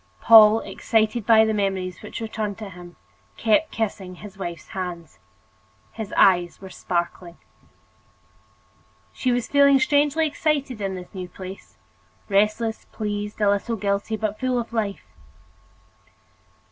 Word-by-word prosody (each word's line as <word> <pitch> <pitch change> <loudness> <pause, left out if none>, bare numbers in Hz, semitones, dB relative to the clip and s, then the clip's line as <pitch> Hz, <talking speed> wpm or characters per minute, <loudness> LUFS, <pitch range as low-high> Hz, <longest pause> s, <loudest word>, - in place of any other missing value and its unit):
Paul, 220 -1 +8
excited 220 0 -1
by 220 -1 +6
the 220 - 0
memories 190 -4 -2
which - - -8
returned 220 -2 -4
to 210 -3 -8
him, 175 0 -12 0.4
kept 230 +8 +2
kissing 195 -4 -4
his 205 +2 -11
wife's 175 -3 -7
hands. 170 - -6 0.7
His 220 -3 -7
eyes 175 -2 +4
were 190 -1 -11
sparkling. 175 -1 -4 1.8
She 255 - -1
was 245 -1 -1
feeling 280 -1 +5
strangely 290 +3 +2
excited 285 -6 -1
in 195 -1 -2
this 180 -1 -10
new 185 -2 -6
place, 190 +1 -10 0.5
restless, 215 +3 +1
pleased, 210 -1 -5
a 205 - +4
little 205 +3 -1
guilty, 205 +1 -2
but 215 -1 -3
full 255 -1 0
of 235 0 -6
life. 210 -3 -2
210 Hz, 130 wpm, -23 LUFS, 190-230 Hz, 1.8 s, Paul